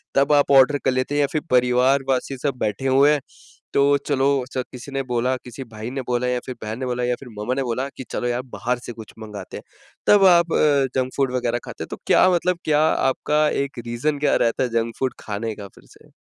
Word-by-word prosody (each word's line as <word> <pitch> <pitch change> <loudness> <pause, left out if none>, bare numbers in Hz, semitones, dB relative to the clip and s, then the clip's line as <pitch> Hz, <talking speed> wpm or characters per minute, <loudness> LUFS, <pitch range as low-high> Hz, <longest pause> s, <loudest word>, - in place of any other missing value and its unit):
तब 140 +2 +3
आप 145 -1 +3
ऑर्डर 140 +1 +6
कर 130 - +4
लेते 130 +3 -1
है। - - +1
या 140 - +2
फिर 155 - -1
परिवार 125 +2 +3
वासी 135 +1 -1
सब 140 +1 -2
बैठे 110 +5 -2
हुए 135 +3 +5
हैं 150 - +2 0.5
तो 140 +1 +4
चलो 135 -2 +2 0.3
च 130 - -1
किसी 130 +2 -9
ने 135 0 -2
बोला 125 0 0
किसी 125 +2 -8
भाई 110 +2 -6
ने 135 0 -3
बोला 125 0 0
या 125 0 0
फिर 130 - -6
बहन 110 +2 -5
ने 130 - -3
बोला 125 0 -2
या 125 0 +1
फिर 135 - -11
मम्मा 105 +5 -1
ने 135 - -1
बोला 125 +2 -2
कि - - -6
चलो 120 - -2
यार 120 +1 -1
बाहर 125 +1 -1
से 120 - -6
कुछ 110 -2 -12
मँगाते 105 -3 -8
हैं। - - -10 0.4
तब 205 -2 +6
आप 170 -2 +5
अ, - - +3 0.4
जंक 130 0 0
फूड 135 -2 +1
वग़ैरह 120 -1 -1
खाते - - -7
हैं - - -8
तो - - -5
क्या 185 - +5
मतलब 180 0 +1
क्या 150 -1 +3
आपका 150 +3 +1
एक 140 -2 -3
रीजन 140 +6 -1
क्या 145 - +2
रहता 115 +2 0
है 125 - -1
जंक 115 0 -4
फूड 130 -1 0
खाने 110 +1 -4
का 100 -1 -9
फिर - - -17
से। - - -22
130 Hz, 245 wpm, -22 LUFS, 120-140 Hz, 0.5 s, ऑर्डर